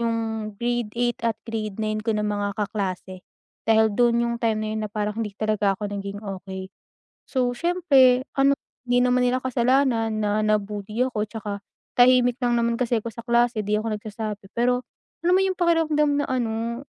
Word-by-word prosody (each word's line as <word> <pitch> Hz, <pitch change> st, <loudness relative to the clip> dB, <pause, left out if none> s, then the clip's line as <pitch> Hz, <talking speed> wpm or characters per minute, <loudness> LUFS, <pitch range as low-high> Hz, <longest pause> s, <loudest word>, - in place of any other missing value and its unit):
yung 225 Hz, -2 st, -1 dB
grade 240 Hz, -1 st, -1 dB
8 240 Hz, 0 st, 0 dB
at 225 Hz, -2 st, 0 dB
grade 215 Hz, -3 st, -4 dB
9 215 Hz, 0 st, -1 dB
ko 220 Hz, +1 st, -1 dB
ng 210 Hz, -, -1 dB
mga 205 Hz, -1 st, -2 dB
kaklase 190 Hz, -3 st, -3 dB, 0.5 s
dahil 220 Hz, -1 st, +4 dB
dun 235 Hz, +2 st, +3 dB
yung 235 Hz, 0 st, -1 dB
time 220 Hz, -2 st, +1 dB
na 215 Hz, 0 st, -2 dB
na -, -, -34 dB
parang 210 Hz, 0 st, -2 dB
hindi 210 Hz, -3 st, -4 dB
talaga 210 Hz, -2 st, +1 dB
ako 205 Hz, +1 st, -4 dB
naging 200 Hz, 0 st, -5 dB
okey. 190 Hz, -1 st, -6 dB, 0.6 s
So 255 Hz, -3 st, +1 dB
siyempre 270 Hz, -6 st, +4 dB
ano 275 Hz, +1 st, +5 dB, 0.3 s
hindi 245 Hz, 0 st, +3 dB
naman 250 Hz, 0 st, +3 dB
nila 255 Hz, -, +1 dB
kasalanan 245 Hz, -3 st, +2 dB
na 210 Hz, +1 st, +1 dB
na-bully 210 Hz, +2 st, 0 dB
ako 215 Hz, -5 st, -2 dB
tsaka 210 Hz, -3 st, -5 dB, 0.4 s
tahimik 245 Hz, 0 st, +5 dB
lang 240 Hz, -1 st, +2 dB
naman 235 Hz, 0 st, +1 dB
kasi 240 Hz, -1 st, +2 dB
ako 230 Hz, -, -5 dB
sa 235 Hz, -, -8 dB
klase 240 Hz, -1 st, +2 dB
'di 210 Hz, +1 st, 0 dB
ako 220 Hz, 0 st, -2 dB
nagsasabi 210 Hz, 0 st, -5 dB, 0.2 s
pero, 245 Hz, +1 st, +2 dB, 0.4 s
alam 350 Hz, +1 st, +3 dB
mo -, -, +3 dB
yung 380 Hz, -, +1 dB
pakiramdam 320 Hz, -4 st, +2 dB
na -, -, -2 dB
ano 235 Hz, -1 st, -2 dB
225 Hz, 175 wpm, -24 LUFS, 210-245 Hz, 0.6 s, ano